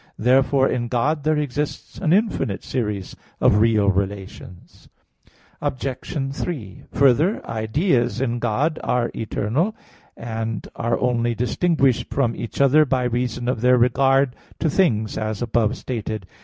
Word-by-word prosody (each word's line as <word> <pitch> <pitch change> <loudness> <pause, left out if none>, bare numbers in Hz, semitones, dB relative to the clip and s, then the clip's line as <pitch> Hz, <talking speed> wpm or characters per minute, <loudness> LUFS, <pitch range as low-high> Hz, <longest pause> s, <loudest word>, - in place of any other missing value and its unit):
Therefore 130 +2 +3
in 120 -1 -1
God 140 +6 0
there 155 0 +2
exists 145 0 -3
an 165 -5 0
infinite 190 - +1
series 105 -7 -3 0.2
of 105 - +4
real 110 -2 +3
relations. 95 -2 -6 0.7
Obj. 135 0 -3
3: 125 - -5
Further, 140 - +3
ideas 120 - 0
in 120 -2 -1
God 135 +8 0
are 120 -1 0
eternal 115 - -1
(Q. - - -30 0.3
15, - - -41
A. 120 - -8
1); 110 - -4
and 110 -2 -5
are 115 0 -1
only 120 -1 +1
distinguished 135 - +1
from 120 -4 0
each 115 - -6
other 140 +3 +5
by 130 -3 0
reason 125 0 -2
of 125 -3 -1
their 125 +1 +5
regard 135 +2 +3 0.2
to 160 - 0
things, 110 - +1
as 110 -1 -3
above 120 -1 0
stated. 110 -5 -4
125 Hz, 145 wpm, -22 LUFS, 110-140 Hz, 0.7 s, other